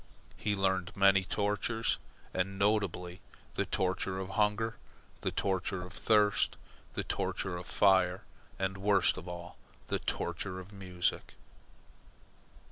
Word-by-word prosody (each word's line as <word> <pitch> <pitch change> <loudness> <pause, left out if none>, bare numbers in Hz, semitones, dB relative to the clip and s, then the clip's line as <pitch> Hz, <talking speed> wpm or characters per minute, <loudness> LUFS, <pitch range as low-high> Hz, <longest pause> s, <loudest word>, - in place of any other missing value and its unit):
He 105 -1 0
learned 95 -2 0
many 100 -1 +6
tortures, 105 +4 0 0.3
and, 95 +1 -1
notably, 100 -3 0 0.3
the - - -1
torture 95 0 0
of 95 0 -4
hunger, 105 +2 +1 0.4
the - - 0
torture 95 -1 -1
of 90 -1 -9
thirst, 105 -2 +3 0.4
the - - 0
torture 95 - -2
of 90 0 -6
fire, 95 -2 +4 0.3
and, 95 0 -1
worst 95 -4 +4
of 85 - -8
all, 85 0 -7 0.3
the - - +1
torture 90 +2 -2
of 95 +3 -11
music. 90 -3 -2
95 Hz, 125 wpm, -32 LUFS, 90-100 Hz, 0.4 s, many